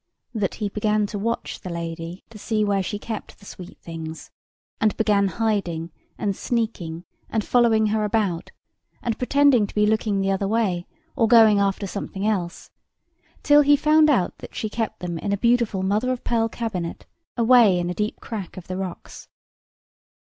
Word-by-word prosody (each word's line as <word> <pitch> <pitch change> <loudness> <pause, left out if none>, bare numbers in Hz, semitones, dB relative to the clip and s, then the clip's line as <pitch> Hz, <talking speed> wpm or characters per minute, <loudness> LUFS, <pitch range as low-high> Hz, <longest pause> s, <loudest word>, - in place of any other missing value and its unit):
That 205 -5 -1
he 210 - -2
began 210 +1 0
to 205 0 -5
watch 230 +3 -3
the 185 - -7
lady 170 +1 -6
to 215 - -11
see 215 0 0
where 200 -1 +1
she 205 +3 -3
kept 220 +1 -7
the 200 - -18
sweet 180 -2 -10
things: 160 -1 -8 0.5
and 215 -1 +1
began 205 -2 +3
hiding, 190 -7 -1 0.3
and 200 -2 -1
sneaking, 190 -9 -3 0.2
and 220 -2 -1
following 230 -3 +3
her 215 -1 +1
about, 205 -5 -1 0.5
and 230 -2 -1
pretending 265 -4 +4
to - - -14
be 210 0 +3
looking 215 -1 +1
the 195 0 +1
other 195 0 0
way, 195 -5 0 0.3
or 230 -5 +3
going 220 -3 +6
after 200 0 0
something 200 0 -5
else, 185 -5 -2 0.7
till 295 0 +6
he 290 0 +5
found 305 +1 +4
out 215 -12 +2
that - - -11
she 215 - -3
kept 225 -3 -3
them 170 -2 -4
in 200 - -3
a - - 0
beautiful 235 -3 +1
mother 210 +6 +1
of 255 - -4
pearl 225 -1 +1
cabinet 195 -8 -4 0.3
away 230 -5 +6
in 175 0 -1
a 180 - -2
deep 210 +3 -3
crack 205 -7 -7
of 180 - -8
the 185 - -5
rocks. 185 -2 -7
210 Hz, 175 wpm, -23 LUFS, 185-225 Hz, 0.7 s, going